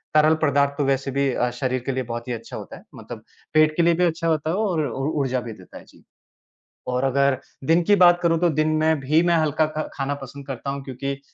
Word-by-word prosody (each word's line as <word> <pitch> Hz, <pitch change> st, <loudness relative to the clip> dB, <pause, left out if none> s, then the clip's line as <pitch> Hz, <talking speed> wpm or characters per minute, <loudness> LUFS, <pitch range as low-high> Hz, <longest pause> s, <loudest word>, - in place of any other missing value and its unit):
तरल 155 Hz, +1 st, +5 dB
पदार्थों 140 Hz, 0 st, +1 dB
वैसे 135 Hz, 0 st, 0 dB
भी 140 Hz, 0 st, +1 dB
अ, 125 Hz, -, 0 dB
शरीर 130 Hz, +1 st, -2 dB
के 135 Hz, -, -1 dB
लिए 130 Hz, 0 st, -2 dB
बहुत 115 Hz, +1 st, -6 dB
ही 125 Hz, -, -2 dB
अच्छा 115 Hz, -, -7 dB
होता -, -, -9 dB
है, -, -, -16 dB
मतलब -, -, -10 dB, 0.3 s
पेट 155 Hz, 0 st, +4 dB
के 170 Hz, -, +3 dB
लिए 170 Hz, 0 st, +4 dB
भी 180 Hz, -, +1 dB
अच्छा 165 Hz, 0 st, -1 dB
होता 155 Hz, -1 st, 0 dB
है 175 Hz, -, 0 dB
और 185 Hz, -8 st, 0 dB
ऊ 135 Hz, +1 st, -3 dB, 0.2 s
ऊर्जा 130 Hz, -2 st, -1 dB
भी 115 Hz, -2 st, -7 dB
देता 90 Hz, -3 st, -14 dB
है, -, -, -12 dB
जी। -, -, -21 dB, 0.8 s
और 125 Hz, +1 st, -1 dB
अगर 140 Hz, 0 st, +2 dB, 0.3 s
दिन 170 Hz, +1 st, +4 dB
की 205 Hz, +4 st, +4 dB
बात 175 Hz, 0 st, +5 dB
करूँ 165 Hz, -1 st, +2 dB
तो 175 Hz, -, +4 dB
दिन 155 Hz, -, +1 dB
में 160 Hz, -2 st, +2 dB
भी 150 Hz, +5 st, +2 dB
मैं 170 Hz, -1 st, +3 dB
हल्का 155 Hz, 0 st, +1 dB
खा 155 Hz, 0 st, -4 dB
खाना 140 Hz, +1 st, -2 dB
पसंद 140 Hz, +1 st, -10 dB
करता 135 Hz, +1 st, -5 dB
हूँ, 140 Hz, 0 st, -6 dB
क्योंकि 135 Hz, +1 st, -5 dB
140 Hz, 245 wpm, -23 LUFS, 130-160 Hz, 0.8 s, तरल